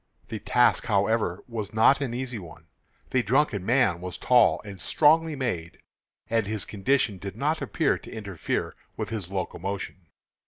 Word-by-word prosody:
The 110 - -4
task, 120 +4 +3
however, 100 -3 +1
was 110 -3 -5
not 135 +6 +5
an 135 -4 -1
easy 125 -1 -4
one. 80 -3 -12 0.5
The 130 - +3
drunken 120 -3 +1
man 110 -6 +2
was 90 0 -6
tall 125 -3 +4
and 100 -3 -9
strongly 160 +1 +3
made, 90 -12 -3 0.5
and 115 -3 0
his 105 -2 -2
condition 105 -1 0
did 100 0 -7
not 150 +6 0
appear 160 -4 0
to - - -12
interfere 100 -6 -3 0.2
with - - -3
his 105 -5 -4
locomotion. 95 -1 -4
110 Hz, 155 wpm, -26 LUFS, 95-125 Hz, 0.5 s, not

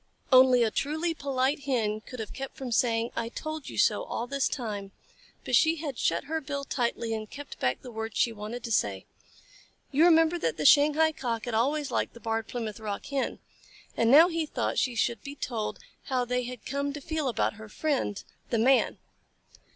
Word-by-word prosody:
Only 255 -1 +7
a 220 - +1
truly 315 +7 -1
polite 275 -1 -1
Hen 220 -6 0
could 250 +2 -10
have 220 - -5
kept 270 0 -7
from 260 -3 -5
saying 230 0 +1
"I 230 - -2
told 310 +3 -6
you - - -8
so," - - +3
all 240 - -3
this 275 +2 0
time, 205 -6 -4 0.5
but - - +2
she 320 0 +5
had 295 -5 -5
shut 170 - +1
her 320 +2 -3
bill 280 -1 -4
tightly 235 -4 -1
and 215 -1 -4
kept 290 0 -9
back 125 0 0
the 250 - -8
words 220 0 -5
she 235 - +3
wanted 225 +3 -6
to 230 - -5
say. 100 - 0 0.9
You 300 +5 +5
remember 325 0 +5
that 165 - -1
the 150 - -2
Shanghai 300 - +6
Cock 240 -5 -3
had 240 - -4
always 280 +6 +1
liked - - -1
the - - -10
Barred 225 -1 -2
Plymouth 225 -4 -5
Rock 210 -2 -5
Hen, 275 -2 -2 0.6
and 230 - +2
now 305 +7 +9
he 330 -3 -2
thought - - -1
she 250 -3 0
should 230 -1 0
be 280 0 -8
told 230 -6 -3 0.3
how 255 -2 0
they 250 0 -1
had 250 0 -8
come 280 0 -2
to 295 - -6
feel 315 0 -2
about 230 -3 0
her 220 - -10
friend, 270 -7 -1 0.3
the 235 - +1
Man. 255 +4 +3
250 Hz, 200 wpm, -28 LUFS, 225-285 Hz, 0.9 s, now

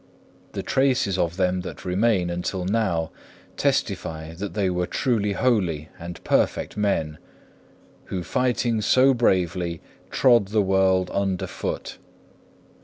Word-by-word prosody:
The - - -4
traces 125 -8 +1
of 85 +1 0
them 90 -1 +1
that 90 - -8
remain 95 -1 +1
until 90 +1 -3
now 95 -6 0 0.4
testify 80 0 -1
that 100 +4 -6
they 100 -3 +1
were 90 -1 -1
truly 105 -5 0
holy 90 -10 0
and 85 +1 -8
perfect - - +1
men, 80 -8 -1 0.9
who 90 -2 -4
fighting 120 -1 0
so 130 +6 +5
bravely 90 -7 +1 0.3
trod 120 -6 +4
the 105 +1 +2
world 95 -1 +2
underfoot. 95 -2 -3
95 Hz, 115 wpm, -24 LUFS, 90-110 Hz, 0.9 s, so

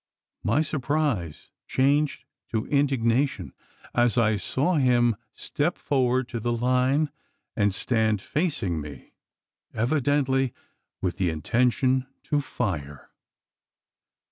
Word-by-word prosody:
My 135 +9 +2
surprise 140 - -2 0.2
changed 140 +3 +1 0.2
to 110 -1 -1
indignation 135 -2 +1 0.4
as 120 -1 +2
I 110 -2 +3
saw 150 - 0
him 120 -4 +3 0.2
step 155 +5 -2
forward 130 -2 +1
to 120 - -3
the 120 +2 -1
line, 130 +5 +2 0.4
and 105 -2 +2
stand 110 +1 +1
facing 100 - -1
me 75 -2 -10 0.6
evidently 135 +1 +1 0.5
with 90 0 -1
the 95 -3 +1
intention 125 - +1 0.2
to 145 -1 0
fire! 75 - -4
125 Hz, 100 wpm, -26 LUFS, 110-140 Hz, 0.6 s, I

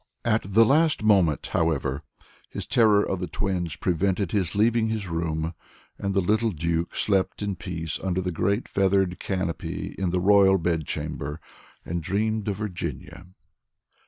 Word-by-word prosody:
At 115 -1 +2
the 115 +3 +6
last 155 0 +3
moment, 95 -8 +3
however, 75 -4 0 0.5
his - - -6
terror 105 -3 +4
of 95 - -2
the 90 - -3
twins 90 -2 -2
prevented 95 +1 0
his 95 -4 -1
leaving 110 +2 +3
his 110 -3 -3
room, 80 -1 -2 0.5
and 100 0 -2
the 95 - +3
little 110 +5 +2
Duke 85 -1 -2
slept 100 0 0
in 100 -2 -2
peace 80 -3 -5
under 95 -1 -1
the 90 0 -2
great 100 +7 0
feathered 95 -2 +1
canopy 90 -4 -3
in 95 -2 0
the 90 +1 0
Royal 95 0 +5
Bedchamber, 80 -3 -3 0.5
and 85 0 -3
dreamed 105 +5 -1
of 100 - 0
Virginia. 85 - -6
95 Hz, 150 wpm, -25 LUFS, 85-105 Hz, 0.5 s, the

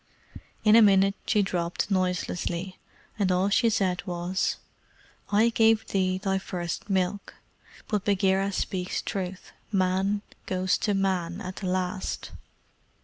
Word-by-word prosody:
In 215 0 +6
a 230 - +8
minute 195 -2 +5
she 210 -3 +3
dropped 180 +1 -2
noiselessly, 185 -1 -1 0.4
and 190 -2 +2
all 185 +2 +2
she 230 +3 +3
said 190 -4 0
was: 175 +1 -1 0.8
"I 215 +3 +4
gave 225 -1 +3
thee 185 -1 +1
thy 190 0 -1
first 180 +1 -5
milk; 190 +1 -1 0.5
but 210 -3 -1
Bagheera 195 -1 +2
speaks 185 -1 -2
truth: 185 -1 -5 0.2
Man 195 +1 +1 0.2
goes 185 0 +1
to 205 -2 0
Man 185 -2 -1
at 185 -3 -7
the 190 - -4
last." 185 +1 -2
190 Hz, 130 wpm, -27 LUFS, 185-200 Hz, 0.8 s, a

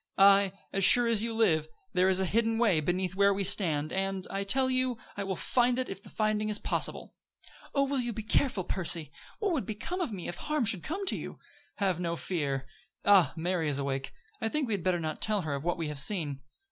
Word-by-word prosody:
Aye, 195 0 +6 0.2
as 195 - +1
sure 240 +5 +7
as 230 -3 +3
you 230 +1 -2
live, 180 -9 +2 0.3
there 185 +1 +3
is 190 0 +3
a 190 - +1
hidden 225 +3 +1
way 215 -9 +3
beneath 180 +4 -1
where 200 +1 +4
we 200 0 -1
stand, 165 -6 0
and, 195 0 -2
I 195 0 -2
tell 260 +7 +3
you, 255 -2 0 0.2
I 200 - -3
will 195 -1 -2
find 245 +5 +1
it 255 - -1
if 195 0 -7
the - - -13
finding 215 -1 0
is 210 - +2
possible." - - -2 0.6
"Oh, 275 0 +3
you 245 -2 -1
will 235 - -2
be 220 - -4
careful, 220 -2 +1
Percy! 170 -5 -1 0.3
What 410 -4 0
would 280 -8 -2
become 285 - -4
of 330 - -2
me 190 -4 -6
if 175 - -5
harm 300 -5 -1
should 200 -4 +1
come 385 - -4
to - - +2
you?" - - -7 0.4
"Have 190 -4 0
no 170 -1 -1
fear. 140 -7 -2 0.4
Ah, 190 -8 +6
Mary 170 -1 0
is 140 - -1
awake. 135 -1 -3 0.3
I 225 - 0
think 300 +1 -1
we 225 - -1
had 200 - -1
better 180 0 +1
not 155 -1 -4
tell 215 -2 +1
her 155 -2 -3
of 140 0 -4
what 175 +1 0
we 165 -2 -3
have 150 -2 -3
seen." 145 -3 -2
195 Hz, 235 wpm, -30 LUFS, 170-225 Hz, 0.6 s, sure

